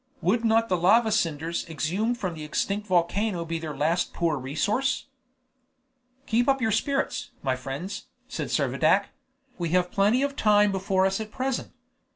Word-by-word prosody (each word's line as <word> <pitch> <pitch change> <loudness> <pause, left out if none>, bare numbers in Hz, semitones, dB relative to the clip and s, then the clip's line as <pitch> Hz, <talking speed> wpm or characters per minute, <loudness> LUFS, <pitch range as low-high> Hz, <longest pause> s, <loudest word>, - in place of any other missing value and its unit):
Would 225 +6 +2
not 225 0 +3
the 185 - +1
lava 220 +6 +4
cinders 165 -4 -1
exhumed 195 +10 -1
from 185 -6 -3
the 155 -2 -8
extinct 200 +7 -2
volcano 180 +1 +1
be 165 0 -3
their 155 -3 -6
last 165 +5 0
poor 165 -3 +1
resource? 205 - -1 1.2
"Keep 240 +2 +2
up 270 0 +3
your 225 -3 +1
spirits, 275 +6 -1
my 130 -2 +1
friends," 140 +10 -6 0.2
said - - -4
Servadac; - - +2 0.5
"we 170 -1 -1
have 180 0 0
plenty 210 +7 +3
of 280 0 -2
time 210 -4 +4
before 190 0 +1
us 195 +1 0
at 215 - -6
present. 260 +3 -3
195 Hz, 160 wpm, -26 LUFS, 165-225 Hz, 1.2 s, lava